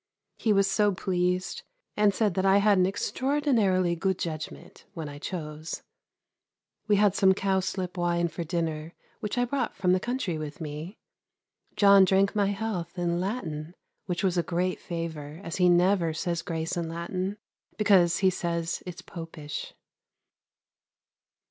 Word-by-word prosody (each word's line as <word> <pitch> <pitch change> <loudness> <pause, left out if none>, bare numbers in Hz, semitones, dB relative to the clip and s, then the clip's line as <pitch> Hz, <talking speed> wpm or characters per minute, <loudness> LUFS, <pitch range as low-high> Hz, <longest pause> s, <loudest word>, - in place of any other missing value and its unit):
He 220 - +2
was 195 -1 +4
so 205 0 +2
pleased, 180 0 -1 0.3
and 210 -1 +4
said 205 -1 +1
that 190 - 0
I 195 0 +5
had 200 -1 +4
an 180 - +4
extraordinarily 205 - +1
good 190 +2 0
judgment, 165 +1 -6
when 160 -3 -4
I 145 0 -8
chose. 155 -1 -5 1.0
We 210 - +4
had 205 -1 +4
some 190 -1 +4
cowslip 190 -2 -1
wine 175 0 +1
for 170 +1 -5
dinner 165 -1 -3 0.2
which 210 +3 -4
I 245 - +3
brought 275 +3 -2
from 185 -2 +2
the 185 - +3
country 235 -8 -2
with 150 -1 -6
me. 155 +5 -6 0.8
John 200 -1 +7
drank 195 +1 +3
my 205 -1 +3
health 195 -4 -3
in 175 -1 0
Latin, 175 -5 -4 0.3
which 180 0 -2
was 180 -2 +2
a - - +4
great 180 +2 -1
favour, 160 -3 -5
as 170 - -4
he 180 -1 +5
never 175 -1 +3
says 170 0 -1
grace 165 0 -3
in 170 -2 -2
Latin, 185 +4 -3 0.4
because 190 -5 +4
he 190 - +6
says 170 -2 -2
it's 180 +1 -7
Popish. 165 -5 -7
180 Hz, 150 wpm, -28 LUFS, 170-195 Hz, 1.0 s, John